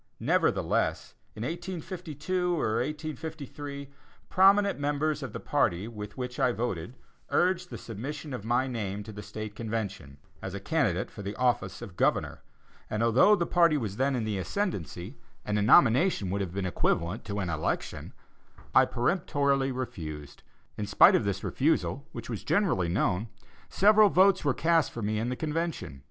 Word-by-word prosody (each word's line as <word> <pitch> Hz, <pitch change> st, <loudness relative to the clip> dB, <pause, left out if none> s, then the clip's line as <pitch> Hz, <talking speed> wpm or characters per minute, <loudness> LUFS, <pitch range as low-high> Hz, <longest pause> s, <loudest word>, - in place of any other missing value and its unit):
Nevertheless, -, -, +1 dB, 0.2 s
in 110 Hz, -, -5 dB
1852 175 Hz, +1 st, -3 dB
or 110 Hz, -4 st, 0 dB
1853, 145 Hz, 0 st, -5 dB, 0.4 s
prominent 200 Hz, -1 st, +4 dB
members 145 Hz, +2 st, 0 dB
of -, -, -5 dB
the -, -, -6 dB
party 90 Hz, +5 st, 0 dB
with 105 Hz, -2 st, -8 dB
which 125 Hz, -1 st, -5 dB
I 125 Hz, -, +3 dB
voted, 115 Hz, -3 st, -3 dB, 0.3 s
urged 180 Hz, 0 st, +1 dB
the -, -, -6 dB
submission 140 Hz, +6 st, -6 dB
of 125 Hz, -, -5 dB
my 120 Hz, +3 st, +1 dB
name 105 Hz, -5 st, -4 dB
to 110 Hz, -, -9 dB
the 105 Hz, 0 st, -8 dB
State 110 Hz, 0 st, -7 dB
Convention, 100 Hz, -, -4 dB, 0.2 s
as 95 Hz, 0 st, -5 dB
a -, -, -4 dB
candidate 100 Hz, -, 0 dB
for 105 Hz, -, -9 dB
the 100 Hz, +1 st, -5 dB
office 120 Hz, -7 st, 0 dB
of 90 Hz, -, -10 dB
Governor, -, -, 0 dB, 0.5 s
and 105 Hz, +1 st, -1 dB
although 125 Hz, -, +5 dB
the 175 Hz, -4 st, -1 dB
party 170 Hz, -3 st, +4 dB
was 105 Hz, -6 st, -4 dB
then 135 Hz, +1 st, +1 dB
in 120 Hz, -, -1 dB
the 105 Hz, -3 st, -2 dB
ascendancy, 100 Hz, -, -3 dB, 0.3 s
and 105 Hz, 0 st, 0 dB
a -, -, +1 dB
nomination 120 Hz, -, +4 dB
would 100 Hz, +1 st, -1 dB
have 95 Hz, -2 st, -4 dB
been 100 Hz, -1 st, -1 dB
equivalent 90 Hz, +2 st, 0 dB
to 105 Hz, -1 st, -4 dB
an 90 Hz, -4 st, -2 dB
election, 80 Hz, -1 st, -3 dB, 0.6 s
I -, -, +7 dB
peremptorily 140 Hz, -1 st, +1 dB
refused; 80 Hz, -, -6 dB, 0.4 s
in 105 Hz, -, -3 dB
spite 100 Hz, -, +7 dB
of -, -, +2 dB
this 100 Hz, -1 st, -2 dB
refusal, 145 Hz, -1 st, 0 dB
which -, -, -7 dB
was -, -, -5 dB
generally 165 Hz, -, +1 dB
known, 95 Hz, +3 st, 0 dB, 0.4 s
several 210 Hz, +1 st, +5 dB
votes 190 Hz, +1 st, +4 dB
were 145 Hz, -3 st, +1 dB
cast 165 Hz, 0 st, +2 dB
for 115 Hz, -, -6 dB
me 105 Hz, +1 st, 0 dB
in 115 Hz, +2 st, -1 dB
the 125 Hz, -, -2 dB
Convention. 160 Hz, -, -3 dB
125 Hz, 165 wpm, -28 LUFS, 100-155 Hz, 0.6 s, I